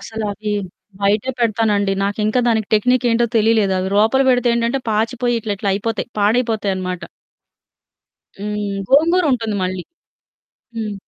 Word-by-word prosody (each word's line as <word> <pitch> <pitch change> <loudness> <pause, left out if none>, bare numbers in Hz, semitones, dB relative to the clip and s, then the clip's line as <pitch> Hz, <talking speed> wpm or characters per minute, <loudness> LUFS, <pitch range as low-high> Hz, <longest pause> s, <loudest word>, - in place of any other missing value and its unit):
అసలవి 210 -1 -4 0.5
బయటే 205 +5 +1
పెడతానండి. 215 -3 +1
నాకింకా 215 +4 0
దానికి 220 -2 0
టెక్నిక్ 250 +4 +2
ఏంటో 235 +1 +2
తెలియలేదు. 220 -2 +3
అవి 185 - -2
లోపల 225 +6 +4
పెడితే 245 -1 +3
ఏంటంటే 235 +3 0
పాచిపోయి 235 +3 0
ఇట్లి‌ట్లా 205 -1 -3
అయిపోతాయి. 215 +3 -2
పాడైపోతాయనమాట. 205 -5 0 1.4
హ్మ్. 205 0 -3 0.2
గోంగూరుంటుంది 280 - +3
మళ్ళీ. 185 -1 -2 0.9
హ్మ్. 215 -2 -3
220 Hz, 110 wpm, -19 LUFS, 205-235 Hz, 1.4 s, లోపల